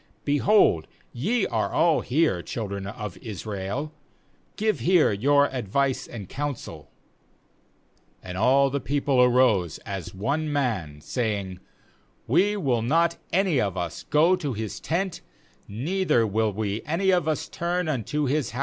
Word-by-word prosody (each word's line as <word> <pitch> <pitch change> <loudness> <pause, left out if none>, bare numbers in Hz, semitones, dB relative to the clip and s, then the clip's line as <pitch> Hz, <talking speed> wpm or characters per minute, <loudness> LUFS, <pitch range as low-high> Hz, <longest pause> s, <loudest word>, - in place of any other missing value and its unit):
7Beholdt 145 - +3 0.3
ye 205 - 0
are - - -1
all 165 -2 +3
here, 135 - +1
children 100 -1 -5
of 105 -2 -6
Israel, 105 - -5 0.6
give 215 0 0
here 180 -7 +4
your 140 +8 +3
ad 125 -5 -4
vice 135 +5 0
and 105 -6 -8
counsel/ 145 +1 -5 1.3
s 95 - -7
8And 90 - -4
all 135 +4 +4
the 140 - -1
peo 145 +1 -1
ple 135 -3 +3
arose 120 -9 +3
as 95 -4 -5
one 145 - -2
man, 100 - -2
saying: 100 - -3 0.3
' - - -38
We 200 +4 +4
wiH 130 - 0
not 170 +4 +2
any 180 -7 +2
of 100 -3 -2
us 85 -2 -4
go 165 +5 +3
to 145 -6 -3
his 110 -1 -5
tent^ 180 +3 -2 0.5
neither 135 - +1
will 110 +1 0
we 105 +1 -3
any 185 +5 +2
of 175 -3 +2
us 155 - -1
turn 175 0 -2
unto 145 +1 -1
his 140 -2 0
house. 125 - -6
130 Hz, 150 wpm, -25 LUFS, 105-155 Hz, 1.3 s, here